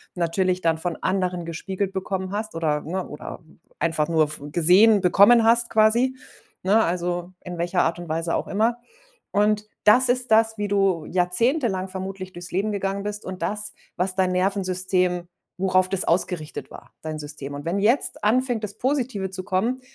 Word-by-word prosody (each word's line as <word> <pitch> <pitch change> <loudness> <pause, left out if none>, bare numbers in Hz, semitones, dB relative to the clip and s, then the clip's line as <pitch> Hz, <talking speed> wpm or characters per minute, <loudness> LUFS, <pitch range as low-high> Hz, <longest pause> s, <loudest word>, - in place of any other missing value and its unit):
natürlich 180 +2 0
dann 165 -2 +1
von 170 +1 -3
anderen 185 -2 -1
gespiegelt 190 +4 -4
bekommen 190 0 -3
hast 215 -2 -4
oder 155 -3 0
ne, 180 +4 -4
oder, 150 - -8
äh, 160 - -22 0.3
einfach 155 -1 0
nur 160 -1 +3
f 150 0 -7
gesehen 190 +5 +6
bekommen 200 +6 +6
hast 235 +1 +4
quasi, 230 +4 +3 0.5
ne? 205 +4 +4
Also, 175 +1 -2
in 180 -1 -7
welcher 175 +1 0
Art 170 - -1
und 175 - -8
Weise 165 +1 -1
auch - - -2
immer. 225 +4 +1 0.5
Und 210 +1 +1 0.2
das 245 +4 +5
ist 250 -1 0
das, 225 0 +4
wie 205 0 -2
du 195 -5 +1
jahrzehntelang 190 - +1
vermutlich 190 0 -6
durchs 175 0 -8
Leben 200 +4 -1
gegangen 195 0 -2
bist 210 0 -5
und 185 -1 -7
das, 210 0 -2 0.2
was 185 +1 0
dein 185 -1 +1
Nervensystem 185 -1 0 0.3
worauf 185 -1 +2
das 195 -1 +3
ausgerichtet 170 -2 -1
war, - - -13
dein 155 -1 -5
System. 145 -1 -7
Und 145 0 -7
wenn 175 +4 -1
jetzt 230 +7 +1
anfängt, 240 +1 +1
das 205 -1 -4
Positive 250 -7 -1
zu 185 0 -5
kommen, 225 +8 -1
190 Hz, 175 wpm, -23 LUFS, 175-210 Hz, 0.5 s, gesehen